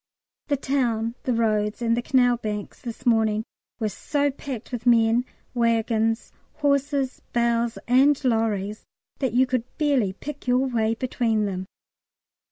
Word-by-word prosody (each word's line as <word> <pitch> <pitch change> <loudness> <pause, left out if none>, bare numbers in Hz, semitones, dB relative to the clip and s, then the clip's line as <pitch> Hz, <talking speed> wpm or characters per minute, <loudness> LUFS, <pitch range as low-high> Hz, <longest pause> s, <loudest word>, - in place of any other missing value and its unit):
The 285 - +1
town, 235 -5 0
the 255 - +1
roads, 215 -2 +1
and 230 -1 +1
the 240 - 0
canal 245 -1 +3
banks 210 -3 -5
this 240 +1 -7
morning 220 -2 +3 0.4
were 220 -2 0
so 285 - -1
packed 265 -4 -7
with 245 -1 -4
men, 230 +1 +4 0.3
waggons, 225 -1 +1 0.2
horses, 280 -2 0
bales, 235 -1 +1
and 270 +4 +5
lorries, 215 -3 0 0.4
that 260 -5 0
you 255 +2 +5
could 250 -1 -3
barely 270 -10 +2
pick 285 +6 -8
your 250 +2 +3
way 225 -3 0
between 225 -3 0
them. 190 -2 -4
235 Hz, 140 wpm, -24 LUFS, 220-260 Hz, 0.4 s, and